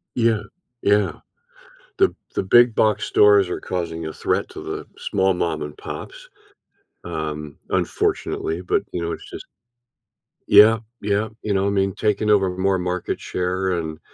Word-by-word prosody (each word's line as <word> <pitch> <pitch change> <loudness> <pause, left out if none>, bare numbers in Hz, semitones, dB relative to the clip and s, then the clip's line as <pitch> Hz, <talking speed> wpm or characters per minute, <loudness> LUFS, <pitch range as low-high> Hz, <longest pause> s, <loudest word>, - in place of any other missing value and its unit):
Yeah. 115 -3 +2 0.4
Yeah. 105 0 +2 0.8
The 385 -1 +3 0.2
the - - 0
big 120 +3 +5
box 110 -1 +2
stores 100 -3 +5
are - - -3
causing 85 -3 -4
a 80 - -5
threat - - -1
to - - -9
the - - -5
small 95 0 +1
mom-and-pops, 85 - -5 0.8
um, 75 -3 -5
unfortunately, 80 +3 -1
but, 90 - 0
you 85 - -3
know, 85 0 -2
it's - - -7
just - - -9 1.0
yeah, 105 +2 +8 0.2
yeah, 105 +1 0
you 105 - -1
know, 95 +1 +1
I - - +2
mean, 95 -1 +1
taking 105 0 0
over 100 -3 +4
more 95 0 +2
market 90 0 -2
share, 90 0 -1
and 80 -1 -5
95 Hz, 145 wpm, -22 LUFS, 85-105 Hz, 1.0 s, yeah